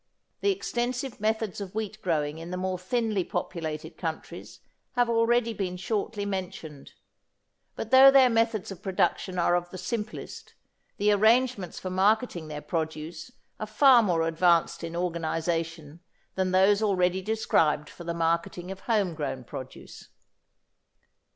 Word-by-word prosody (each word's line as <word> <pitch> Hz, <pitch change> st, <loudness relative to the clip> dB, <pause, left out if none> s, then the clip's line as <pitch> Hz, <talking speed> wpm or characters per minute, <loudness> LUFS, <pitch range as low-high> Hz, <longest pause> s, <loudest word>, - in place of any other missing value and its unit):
The 405 Hz, -, +1 dB
extensive 250 Hz, -, -3 dB
methods 215 Hz, -1 st, -1 dB
of 195 Hz, 0 st, -7 dB
wheat 220 Hz, -2 st, -4 dB
growing 155 Hz, -3 st, -1 dB
in 165 Hz, +1 st, -8 dB
the 180 Hz, -, -4 dB
more 185 Hz, 0 st, -2 dB
thinly 215 Hz, 0 st, 0 dB
populated 160 Hz, -2 st, -5 dB
countries 160 Hz, -3 st, -6 dB, 0.3 s
have 245 Hz, -1 st, +2 dB
already 230 Hz, 0 st, +2 dB
been 185 Hz, -4 st, -3 dB
shortly 205 Hz, +2 st, -2 dB
mentioned. 185 Hz, -7 st, -6 dB, 0.8 s
But 225 Hz, -, -6 dB
though 265 Hz, +1 st, +9 dB
their 270 Hz, -1 st, +7 dB
methods 225 Hz, -4 st, 0 dB
of 190 Hz, -1 st, -9 dB
production 190 Hz, -1 st, -1 dB
are 175 Hz, 0 st, +2 dB
of 175 Hz, 0 st, -2 dB
the 185 Hz, -, -8 dB
simplest, 210 Hz, +4 st, -6 dB, 0.4 s
the 210 Hz, +1 st, +3 dB
arrangements 220 Hz, -2 st, +2 dB
for 185 Hz, -, -5 dB
marketing 195 Hz, -2 st, +1 dB
their 150 Hz, -1 st, -6 dB
produce 160 Hz, +3 st, -4 dB, 0.3 s
are 215 Hz, -, -4 dB
far 250 Hz, +3 st, +6 dB
more 175 Hz, -6 st, +1 dB
advanced 170 Hz, 0 st, +2 dB
in 165 Hz, 0 st, -5 dB
organisation 165 Hz, -2 st, -2 dB, 0.3 s
than 190 Hz, -1 st, 0 dB
those 195 Hz, +3 st, +4 dB
already 185 Hz, -3 st, +1 dB
described 165 Hz, -8 st, +1 dB
for 175 Hz, -, -11 dB
the 170 Hz, 0 st, -3 dB
marketing 170 Hz, +2 st, -1 dB
of 190 Hz, -, -7 dB
home 205 Hz, -5 st, 0 dB
grown 145 Hz, -4 st, -4 dB
produce. 130 Hz, +2 st, -10 dB
185 Hz, 140 wpm, -27 LUFS, 165-220 Hz, 0.8 s, though